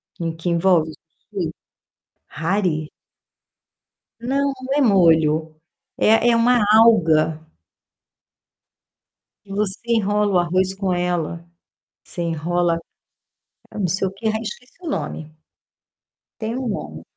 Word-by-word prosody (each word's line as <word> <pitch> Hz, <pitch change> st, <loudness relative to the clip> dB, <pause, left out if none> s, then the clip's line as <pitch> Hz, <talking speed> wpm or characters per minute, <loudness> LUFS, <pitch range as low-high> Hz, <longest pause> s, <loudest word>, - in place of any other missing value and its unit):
Que 165 Hz, -1 st, -3 dB
que 165 Hz, +2 st, -4 dB
envolve 170 Hz, -2 st, +3 dB
o -, -, -12 dB, 0.4 s
sushi? 165 Hz, -4 st, -1 dB, 0.8 s
Hare? 160 Hz, -2 st, -1 dB, 1.3 s
Não, 275 Hz, +3 st, 0 dB
não 270 Hz, +1 st, -2 dB
é -, -, +3 dB
molho, 160 Hz, -, +3 dB, 0.4 s
é 225 Hz, +2 st, +4 dB
é 235 Hz, -, +4 dB
uma 240 Hz, +1 st, +4 dB, 0.2 s
alga. 160 Hz, -9 st, +4 dB, 2.0 s
Que 200 Hz, -, -19 dB
você 200 Hz, -2 st, -1 dB
enrola 210 Hz, -3 st, +1 dB
o -, -, +5 dB
arroz 185 Hz, +2 st, +1 dB
com 195 Hz, -1 st, -2 dB
ela, 175 Hz, -1 st, -2 dB, 0.6 s
você 175 Hz, -, -8 dB
enrola, 170 Hz, +1 st, 0 dB, 1.0 s
não 195 Hz, -4 st, -1 dB
sei 190 Hz, +3 st, 0 dB
o -, -, -5 dB
quê, 210 Hz, +3 st, -5 dB
ah, 220 Hz, 0 st, 0 dB
esqueci 235 Hz, +3 st, -8 dB
o 340 Hz, -, -5 dB
nome. 155 Hz, -, -4 dB, 1.1 s
Tem 225 Hz, +3 st, -3 dB
um 260 Hz, -2 st, -3 dB
nome. 80 Hz, -, -5 dB
185 Hz, 120 wpm, -21 LUFS, 165-220 Hz, 2.0 s, o